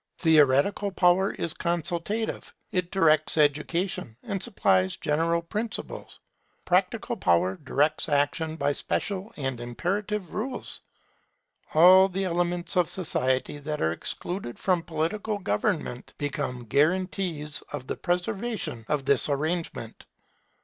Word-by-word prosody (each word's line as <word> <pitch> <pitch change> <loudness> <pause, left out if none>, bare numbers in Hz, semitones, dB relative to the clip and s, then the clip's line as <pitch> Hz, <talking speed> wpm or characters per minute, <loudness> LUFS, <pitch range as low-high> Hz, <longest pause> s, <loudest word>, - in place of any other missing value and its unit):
Theoretical 160 +5 +4
power 185 +1 +3
is 165 - 0
consultative; 175 +5 -2 0.2
it 180 -2 -1
directs 155 -5 +3
education, 150 - 0
and 200 -4 -3
supplies 95 - +2
general 165 +2 0
principles. 215 +6 -4 0.5
Practical 195 +6 +1
power 90 - +2
directs 150 +3 0
action 150 +2 0
by 145 -2 0
special 195 +7 -2
and 135 -4 -3
imperative 190 - -3
rules. 250 +4 -4 0.9
All 185 +4 +8
the 195 +1 -2
elements 175 0 0
of 180 -2 +3
society 130 -5 0
that 150 +1 -4
are 80 - +1
excluded 145 - -4
from 180 -3 +1
political 170 +6 -2
government 150 - -2
become 140 -4 -3
guarantees 155 - 0
for 145 - -4
the 130 - -5
preservation 190 - -2
of 145 -3 0
this 140 +1 +4
arrangement. 155 -5 -3
170 Hz, 115 wpm, -26 LUFS, 145-190 Hz, 0.9 s, All